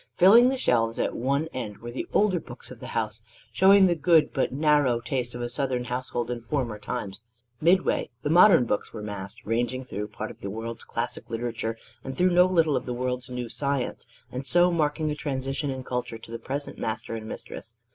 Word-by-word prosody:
Filling 225 Hz, +7 st, +8 dB
the 265 Hz, -, -1 dB
shelves 115 Hz, -, +1 dB
at -, -, -1 dB
one 140 Hz, +5 st, 0 dB
end 110 Hz, -5 st, -5 dB
were 120 Hz, +1 st, -8 dB
the 130 Hz, -, -5 dB
older 200 Hz, -4 st, +3 dB
books 125 Hz, -4 st, -11 dB
of 125 Hz, -, -10 dB
the -, -, -8 dB
house, 110 Hz, 0 st, -2 dB, 0.3 s
showing 195 Hz, +1 st, +7 dB
the 180 Hz, -, +4 dB
good 165 Hz, -1 st, +3 dB
but 135 Hz, -, 0 dB
narrow 145 Hz, -4 st, +3 dB
taste 120 Hz, 0 st, -3 dB
of 120 Hz, -, -4 dB
a -, -, -1 dB
Southern 125 Hz, 0 st, -1 dB
household 125 Hz, -1 st, -3 dB
in 120 Hz, -1 st, -4 dB
former 115 Hz, -3 st, -2 dB
times. 100 Hz, -1 st, -5 dB, 0.4 s
Midway, 180 Hz, +4 st, +3 dB
the 145 Hz, -, -1 dB
modern 175 Hz, -5 st, +7 dB
books 105 Hz, -, -2 dB
were 105 Hz, -, -7 dB
massed, 100 Hz, -2 st, -7 dB
ranging 120 Hz, +3 st, -1 dB
through 105 Hz, -4 st, -5 dB
part 110 Hz, +1 st, -6 dB
of -, -, -16 dB
the 100 Hz, -, -4 dB
world's 115 Hz, +2 st, -6 dB
classic -, -, -4 dB
literature 115 Hz, -1 st, -3 dB, 0.3 s
and 135 Hz, -1 st, -6 dB
through 180 Hz, 0 st, +3 dB
no 180 Hz, +1 st, +6 dB
little 165 Hz, -5 st, +3 dB
of -, -, -2 dB
the 125 Hz, -, -2 dB
world's 125 Hz, 0 st, -3 dB
new 125 Hz, -1 st, -4 dB
science; 140 Hz, -1 st, -2 dB, 0.2 s
and 130 Hz, +3 st, -5 dB
so 175 Hz, +5 st, +5 dB
marking 155 Hz, -1 st, 0 dB
a -, -, -2 dB
transition 135 Hz, 0 st, -3 dB
in 130 Hz, -1 st, -4 dB
culture 125 Hz, -2 st, -3 dB
to 115 Hz, -, -13 dB
the 115 Hz, -, -5 dB
present 140 Hz, +2 st, -5 dB
master 110 Hz, 0 st, -3 dB
and 110 Hz, -1 st, -5 dB
mistress. 115 Hz, 0 st, -8 dB
125 Hz, 205 wpm, -26 LUFS, 115-150 Hz, 0.4 s, Filling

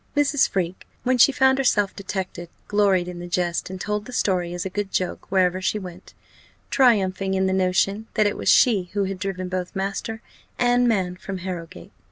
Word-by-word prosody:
Mrs. 285 Hz, -1 st, +3 dB
Freke, 185 Hz, -1 st, -3 dB, 0.2 s
when 255 Hz, 0 st, +1 dB
she 280 Hz, -, +7 dB
found 265 Hz, 0 st, +3 dB
herself 205 Hz, -7 st, +2 dB
detected, 185 Hz, -3 st, -5 dB, 0.2 s
gloried 200 Hz, -4 st, +2 dB
in 180 Hz, -1 st, -7 dB
the 175 Hz, -, -7 dB
jest, 175 Hz, 0 st, -1 dB
and 190 Hz, 0 st, -7 dB
told 210 Hz, +1 st, -2 dB
the 250 Hz, -, -9 dB
story 180 Hz, -7 st, 0 dB
as 175 Hz, +1 st, -4 dB
a -, -, -2 dB
good 205 Hz, 0 st, -3 dB
joke 185 Hz, -, -3 dB
wherever 185 Hz, -1 st, +2 dB
she 200 Hz, -, 0 dB
went 185 Hz, -2 st, -10 dB, 0.6 s
triumphing 195 Hz, -7 st, +2 dB
in 190 Hz, 0 st, +1 dB
the 190 Hz, -, +1 dB
notion, 190 Hz, +3 st, +1 dB
that 215 Hz, -, +3 dB
it 205 Hz, -, +1 dB
was -, -, -1 dB
she 200 Hz, -8 st, +4 dB
who 205 Hz, -1 st, +1 dB
had 190 Hz, -1 st, -4 dB
driven 185 Hz, -2 st, -3 dB
both 180 Hz, 0 st, -4 dB
master 200 Hz, +4 st, -3 dB, 0.3 s
and 245 Hz, 0 st, +3 dB
man 185 Hz, -5 st, 0 dB
from 195 Hz, +1 st, -6 dB
Harrowgate. 170 Hz, -, -7 dB
190 Hz, 195 wpm, -23 LUFS, 180-210 Hz, 0.6 s, she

